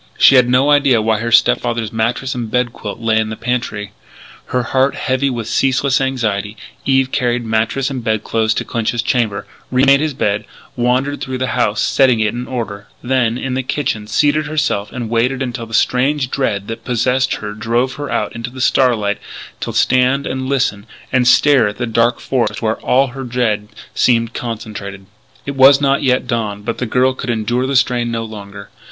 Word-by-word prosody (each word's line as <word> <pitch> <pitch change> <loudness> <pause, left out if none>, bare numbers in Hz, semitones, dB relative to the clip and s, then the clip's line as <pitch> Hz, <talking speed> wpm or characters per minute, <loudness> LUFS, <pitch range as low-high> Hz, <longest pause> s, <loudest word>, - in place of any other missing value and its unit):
She - - +7
had 125 -2 +5
no 130 +4 +3
idea 140 -5 +4
why 110 0 +1
her 120 +1 -3
step 120 - +5
father's 115 -3 -3
mattress 115 +4 -1
and 120 -3 -4
bed 125 0 0
quilt 100 - -7
lay 110 -1 +1
in 110 0 -1
the 110 - -4
pantry. 115 -4 -3 0.6
Her 125 0 -1
heart 130 +3 +1
heavy 130 +1 0
with 120 -4 -4
ceaseless 135 +2 +1
anxiety, 110 -6 -2 0.3
Eve 135 -1 +2
carried 120 -1 0
mattress 115 +5 0
and 130 -3 -4
bed 110 -2 0
clothes 110 -1 0
to - - -2
Clinch's 115 0 -1
chamber, 115 -7 0 0.2
re 130 +1 +2
made 140 0 +5
his 155 -2 -2
bed, 105 -3 -1 0.3
wandered 130 +4 0
through 130 -1 -3
the 130 0 -2
house 105 +1 +1
setting 130 -4 +3
it 110 0 +1
in 120 +1 -5
order; 105 -5 -5 0.2
then, 125 -2 +1
in 130 0 -3
the 130 - 0
kitchen, 125 -5 -3
seated 145 +7 +1
herself 150 -10 -1
and 120 -3 -5
waited 125 +3 +1
until 120 -2 -5
the - - -15
strange 130 +2 +1
dread 100 -7 -1
that 115 - -6
possessed 125 +2 +1
her 105 -1 -6
drove 120 +4 -1
her 145 0 -6
out - - -2
into 115 +1 -5
the 130 +1 -11
starlight 115 -6 +2 0.4
to - - -4
stand 130 +2 +2
and 130 0 -3
listen 125 -6 -1 0.3
and 125 -1 +3
stare 135 -3 +5
at 105 - -5
the 120 - -2
dark 115 +1 +1
forest 130 -3 -1
where 110 -1 -2
all 135 +1 +2
her 135 +2 -7
dread 115 -4 -1 0.3
seemed 115 -2 +2
concentrated. 105 -4 -6 0.4
It 140 - -4
was 135 +1 +7
not 140 -1 +2
yet 125 -2 +1
dawn, 110 -4 -3
but 115 +2 -4
the 125 - -2
girl 130 +3 +2
could 130 - -6
endure 120 +3 0
the 140 - -1
strain 125 -2 +2
no 115 -1 -2
longer. 100 -2 -10
120 Hz, 195 wpm, -17 LUFS, 110-130 Hz, 0.6 s, She